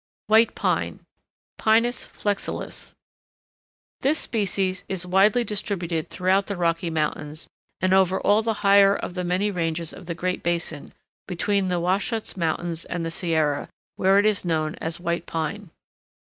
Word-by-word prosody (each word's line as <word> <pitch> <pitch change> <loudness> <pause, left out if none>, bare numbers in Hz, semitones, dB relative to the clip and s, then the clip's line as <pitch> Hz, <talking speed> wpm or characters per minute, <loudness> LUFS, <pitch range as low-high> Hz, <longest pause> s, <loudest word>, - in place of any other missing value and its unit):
WHITE 220 +2 +4
PINE - - -1 0.6
(Pinus 230 +3 +2
flexilis) 205 -1 -4 1.1
This 290 +4 +2
species 195 - -1
is 185 -2 -2
widely 200 +6 +4
distributed 180 -7 -3
throughout 190 +2 +1
the 200 - -3
Rocky 170 0 0
Mountains, 155 -1 -2 0.3
and 185 +1 +3
over 190 0 +4
all 205 +2 +3
the 225 0 0
higher 200 0 +6
of 180 - -5
the 180 0 -3
many 185 +4 +1
ranges 165 -2 -2
of 180 - -12
the 170 - -3
Great 180 +2 -2
Basin, 170 -3 -2 0.4
between 195 +2 0
the 180 -1 0
Wahsatch 200 +6 -1
Mountains 170 -1 -2
and 170 -1 -3
the 165 - -3
Sierra, 160 -4 0 0.3
where 190 +1 +4
it 205 - +4
is 215 -2 +2
known 160 -3 0
as 160 +1 -3
White 170 -1 -2
Pine. 165 +5 -3
185 Hz, 145 wpm, -24 LUFS, 170-200 Hz, 1.1 s, higher